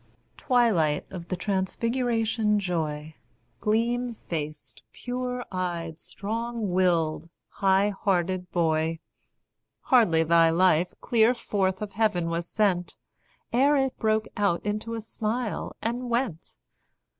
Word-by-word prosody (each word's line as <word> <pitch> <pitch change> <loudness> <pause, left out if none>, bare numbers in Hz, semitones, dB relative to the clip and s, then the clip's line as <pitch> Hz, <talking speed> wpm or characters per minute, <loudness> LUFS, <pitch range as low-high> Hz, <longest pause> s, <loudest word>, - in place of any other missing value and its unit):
Twilight 210 - +2
of 175 -2 -7
the 185 - -2
transfiguration 220 +3 0
joy, 160 -5 -3 0.5
Gleam 235 +3 0
faced, 155 -6 -6
pure 250 0 -4
eyed, 170 -3 -3
strong 225 0 -4
willed, 170 -3 +1 0.2
high 195 +1 +2
hearted 185 -2 -1
boy! 160 -1 +1 0.8
Hardly 185 -11 +4
thy 165 0 +5
life 175 0 +3
clear 235 +1 +3
forth 190 -4 -1
of 205 - -6
heaven 195 -6 +1
was 170 +1 -3
sent, 185 -5 0 0.6
Ere 280 +4 +4
it 270 -1 0
broke 220 0 +1
out 200 -4 0
into 215 +2 -2
a 225 - -4
smile, 220 +1 -3
and 240 +2 -2
went. 235 -9 -2
200 Hz, 110 wpm, -26 LUFS, 170-230 Hz, 0.8 s, thy